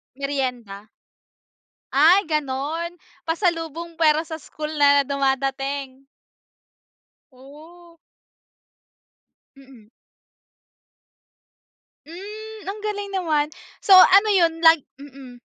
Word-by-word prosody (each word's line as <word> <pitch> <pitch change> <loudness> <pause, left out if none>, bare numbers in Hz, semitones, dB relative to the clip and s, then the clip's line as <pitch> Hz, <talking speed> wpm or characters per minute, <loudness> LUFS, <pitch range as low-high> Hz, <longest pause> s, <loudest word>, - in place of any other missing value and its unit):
Meryenda? 250 -7 -5 1.1
Ay 330 +8 +5
ganon. 305 +4 -3 0.2
Pasalubong 330 -1 -3
pero 310 -2 +3
sa 320 -1 -7
school 305 0 -8
na 285 -1 +4
dumadating. 270 0 -3 1.3
Oh. 320 +6 -17 1.6
Mm. 260 -6 -18 2.2
Hmm, 425 +6 -10
ang 420 +1 -8
galing 410 -1 -4
naman! 315 -6 -1 0.4
So 390 - +5
ano 390 +3 +6
yun 340 -4 +3
lag 325 0 +7 0.2
mm. 260 -3 -14
305 Hz, 75 wpm, -22 LUFS, 275-345 Hz, 2.2 s, lag